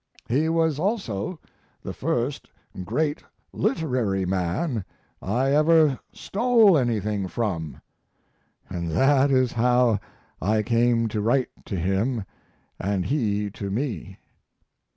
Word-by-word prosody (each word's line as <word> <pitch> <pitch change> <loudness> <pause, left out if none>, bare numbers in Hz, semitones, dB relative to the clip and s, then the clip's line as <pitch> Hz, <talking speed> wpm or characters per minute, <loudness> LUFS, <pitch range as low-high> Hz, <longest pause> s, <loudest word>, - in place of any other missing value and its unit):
He 145 +7 +1
was 160 -3 +1
also 180 - -2 0.4
the - - -5
first 125 +4 -2 0.3
great 145 - -1 0.3
literary 125 - 0
man 95 - -1 0.4
I 125 +7 0
ever 155 -1 +4
stole 225 -3 +3
anything 105 -7 0
from, 90 - -3 0.9
and 85 -2 -4
that 135 - +3
is 130 -2 +3
how 120 -2 +3 0.4
I 105 +4 +1
came 115 +1 +2
to 105 -1 -2
write 120 +4 +1 0.2
to 100 - -4
him 95 +6 0 0.5
and 95 -2 -1
he 105 -4 0
to 100 0 -6
me. 110 - -3
120 Hz, 110 wpm, -25 LUFS, 100-145 Hz, 0.9 s, ever